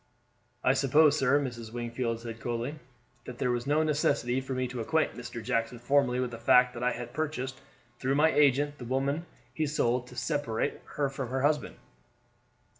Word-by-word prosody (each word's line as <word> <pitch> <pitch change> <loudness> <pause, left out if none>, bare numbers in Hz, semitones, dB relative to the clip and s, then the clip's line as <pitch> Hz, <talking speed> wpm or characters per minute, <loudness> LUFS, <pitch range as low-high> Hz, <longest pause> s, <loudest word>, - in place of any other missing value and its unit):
"I 130 - +4
suppose, 145 +2 +4
sir," 140 -1 +3
Mrs. 120 -5 -5
Wingfield 120 -1 -3
said 115 -1 -7
coldly, 120 +6 -3 0.5
"that 125 - -8
there 125 -1 0
was 120 +2 -2
no 150 +2 +3
necessity 135 -4 +1
for 130 0 -5
me 130 0 0
to 125 -1 -5
acquaint 155 +7 +1
Mr. 120 -1 -7
Jackson 115 +2 -1
formerly 125 +1 +2
with 125 -1 -1
the 115 - -7
fact 125 +1 +5
that 120 - -7
I 125 0 +1
had 120 0 -7
purchased 135 -4 -3 0.4
through 135 +1 0
my 155 +2 +4
agent 145 0 +3
the 120 - -7
woman 140 +6 -1 0.3
he 155 -1 -1
sold 125 -4 0
to 125 - -12
separate 145 -6 -1
her 145 -1 +1
from 135 -2 -5
her 130 +1 -1
husband." 150 -3 +1
130 Hz, 185 wpm, -29 LUFS, 120-145 Hz, 0.5 s, fact